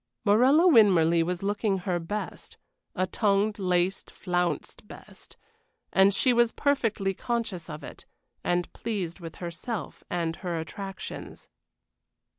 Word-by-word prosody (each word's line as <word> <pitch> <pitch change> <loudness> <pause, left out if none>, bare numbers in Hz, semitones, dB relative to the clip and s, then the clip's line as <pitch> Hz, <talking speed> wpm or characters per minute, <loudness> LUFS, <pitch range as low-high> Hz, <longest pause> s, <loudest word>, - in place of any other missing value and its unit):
Morella 260 - +5
Winmarleigh 175 - +5
was 180 +2 -3
looking 205 0 0
her 180 -1 -2
best. 205 +6 -6 0.4
A 185 - +1
tonged, 205 +2 +1
laced, 180 0 0
flounced 180 +2 -2
best; - - -13 0.6
and 195 +1 +6
she 245 +6 +3
was 235 -1 +3
perfectly 225 -9 0
conscious 215 -6 -3
of 150 -1 -7
it, - - -11 0.4
and 175 0 -1
pleased 195 -6 -4
with 165 -2 -8
herself 175 - -6
and 165 -2 -2
her 175 -3 -3
attractions. 195 +4 -7
195 Hz, 120 wpm, -27 LUFS, 175-215 Hz, 0.6 s, and